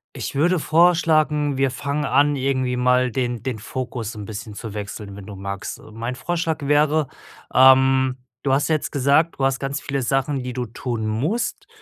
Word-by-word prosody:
Ich -, -, -5 dB
würde 170 Hz, +6 st, +2 dB
vorschlagen, 155 Hz, -3 st, +3 dB
wir 135 Hz, 0 st, +2 dB
fangen 140 Hz, +3 st, -3 dB
an, 145 Hz, +2 st, +3 dB
irgendwie 130 Hz, -2 st, 0 dB
mal 125 Hz, 0 st, +3 dB
den 120 Hz, -2 st, -2 dB
den 130 Hz, -3 st, -3 dB
Fokus 120 Hz, 0 st, -5 dB
'n 105 Hz, -2 st, -7 dB
bisschen 110 Hz, +1 st, -7 dB
zu 105 Hz, 0 st, -7 dB
wechseln, 100 Hz, -1 st, -6 dB
wenn 100 Hz, -, -9 dB
du 100 Hz, 0 st, -9 dB
magst. 100 Hz, 0 st, -6 dB
Mein 115 Hz, +3 st, -5 dB
Vorschlag 165 Hz, +1 st, -2 dB
wäre 150 Hz, 0 st, +3 dB, 0.5 s
ähm, 130 Hz, 0 st, +5 dB, 0.2 s
du 135 Hz, -, +1 dB
hast 140 Hz, +4 st, +2 dB
ja 160 Hz, -, +3 dB
jetzt 155 Hz, -, -3 dB
gesagt, 140 Hz, +4 st, +2 dB
du 135 Hz, -, 0 dB
hast 135 Hz, 0 st, 0 dB
ganz 140 Hz, +1 st, -3 dB
viele 140 Hz, -2 st, -3 dB
Sachen, 135 Hz, +2 st, 0 dB
die 125 Hz, 0 st, -5 dB
du 125 Hz, 0 st, -3 dB
tun 115 Hz, -1 st, -4 dB
musst. 150 Hz, -, -2 dB
130 Hz, 185 wpm, -22 LUFS, 120-145 Hz, 0.5 s, ähm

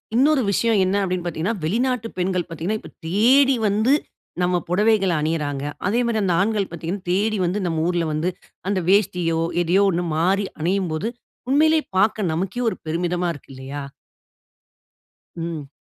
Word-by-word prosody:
இன்னொரு 280 Hz, +3 st, +4 dB
விஷயம் 220 Hz, 0 st, +2 dB
என்ன 190 Hz, +2 st, 0 dB
அப்படின்னு 180 Hz, -2 st, -2 dB
பாத்தீங்கன்னா, 175 Hz, +6 st, -1 dB
வெளிநாட்டு 235 Hz, +6 st, 0 dB
பெண்கள் 180 Hz, -1 st, 0 dB
பாத்தீங்கன்னா. 170 Hz, +7 st, -3 dB
இப்ப -, -, -12 dB, 0.2 s
தேடி 260 Hz, +9 st, +5 dB
வந்து 215 Hz, +6 st, +3 dB, 0.5 s
நம்ம 180 Hz, 0 st, +2 dB
பொடவைகள 200 Hz, 0 st, +3 dB
அணியிறாங்க. 150 Hz, -3 st, -1 dB, 0.2 s
அதே 230 Hz, +5 st, +1 dB
மாதிரி 225 Hz, -2 st, 0 dB
அந்த 180 Hz, -3 st, +2 dB
ஆண்கள் 205 Hz, -1 st, 0 dB
பாத்தீங்கன்னா, 170 Hz, +3 st, -5 dB
தேடி 210 Hz, +3 st, +1 dB
வந்து 185 Hz, +4 st, -1 dB
நம் 165 Hz, -2 st, -1 dB
ஊருல 175 Hz, -1 st, +1 dB
வந்து, 155 Hz, +4 st, 0 dB, 0.4 s
அந்த 200 Hz, -2 st, +1 dB
வேஷ்டியோ 180 Hz, -4 st, +2 dB, 0.2 s
எதையோ 185 Hz, +4 st, +3 dB
ஒண்ணு 175 Hz, 0 st, -1 dB
மாறி 195 Hz, +5 st, +2 dB, 0.2 s
அணியும் 185 Hz, +2 st, 0 dB
போது. 200 Hz, +9 st, -2 dB, 0.4 s
உண்மையிலயே 310 Hz, +2 st, +4 dB
பார்க்க 210 Hz, -3 st, +2 dB
நமக்கே 195 Hz, +8 st, -2 dB
ஒரு -, -, -5 dB
பெருமிதமா 175 Hz, +2 st, -1 dB
இருக்கு 145 Hz, -, -14 dB
இல்லயா? 135 Hz, +2 st, -6 dB, 1.5 s
ம். 165 Hz, -4 st, -5 dB
185 Hz, 150 wpm, -22 LUFS, 170-215 Hz, 1.5 s, தேடி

